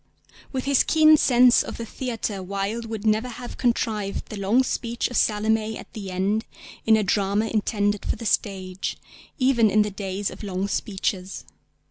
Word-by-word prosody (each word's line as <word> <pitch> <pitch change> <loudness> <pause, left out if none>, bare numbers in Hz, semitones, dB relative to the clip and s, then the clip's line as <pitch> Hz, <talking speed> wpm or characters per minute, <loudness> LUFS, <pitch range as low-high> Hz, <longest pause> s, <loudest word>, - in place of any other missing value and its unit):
With 260 -1 -3
his 280 -1 +4
keen 310 -1 +6
sense 250 -4 +5
of - - -6
the 230 - -5
theatre 225 -4 -4
Wilde 200 +5 -3
would 220 -1 -5
never 215 +3 +2
have 245 +1 -8
contrived 220 -4 -1
the - - -6
long 205 +6 +2
speech 235 -1 -2
of 245 - -7
Salomé 220 +1 +1
at - - -12
the 200 -3 -6
end 195 +4 0 0.4
in 220 -1 +6
a 215 - +1
drama 200 +2 +1
intended 205 -2 0
for - - -1
the 230 - -8
stage, 190 -3 -2 0.4
even 255 -5 +3
in 210 +2 +4
the 210 - -4
days 195 0 -3
of - - -11
long 195 -1 -2
speeches. 195 -2 -3
215 Hz, 170 wpm, -24 LUFS, 200-235 Hz, 0.4 s, keen